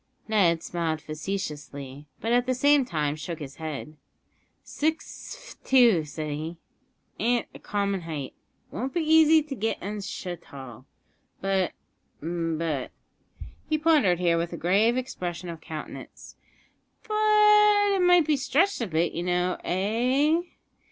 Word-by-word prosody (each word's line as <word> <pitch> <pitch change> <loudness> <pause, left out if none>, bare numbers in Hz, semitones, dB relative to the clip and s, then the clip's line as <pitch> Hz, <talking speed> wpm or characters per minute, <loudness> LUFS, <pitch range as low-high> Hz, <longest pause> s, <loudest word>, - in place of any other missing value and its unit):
Ned 175 -7 +3
smiled 165 -2 -2
facetiously, 150 -4 -6
but 225 - -1
at 245 +1 +3
the 255 - +1
same 285 +1 +4
time 150 - -1
shook 160 +2 -6
his 140 -3 -9
head. 155 -1 -6 0.7
"Six 315 +10 -3 0.2
f't - - -40
two," 235 -11 +5
said 150 +1 -5
he, 160 +3 -5 0.6
"an't 240 +1 +1
a - - -11
common 200 -2 -1
height; 155 -5 -5 0.4
it - - -12
won't 260 +4 -3
be 345 - +2
easy 315 0 +5
to 295 -2 -6
get 225 -2 -1
'un 205 +1 -5
so 185 -2 -5
tall; 135 -8 -12 0.5
but 195 -2 0 0.5
but," 165 -3 -2 0.8
he 310 - +2
pondered 300 - +3
here 170 -1 +2
with 170 0 -2
a - - -4
grave 205 +9 +3
expression 180 -8 -4
of 165 -2 -7
countenance, 155 -2 -9 0.7
"but 420 -1 +5
it 385 - +1
might 355 -2 +5
be 305 0 +2
stretched 310 +7 +1
a 230 - -1
bit, 165 0 0
you 170 - -3
know 180 +1 0
eh? 250 - +1
190 Hz, 145 wpm, -26 LUFS, 160-270 Hz, 0.8 s, two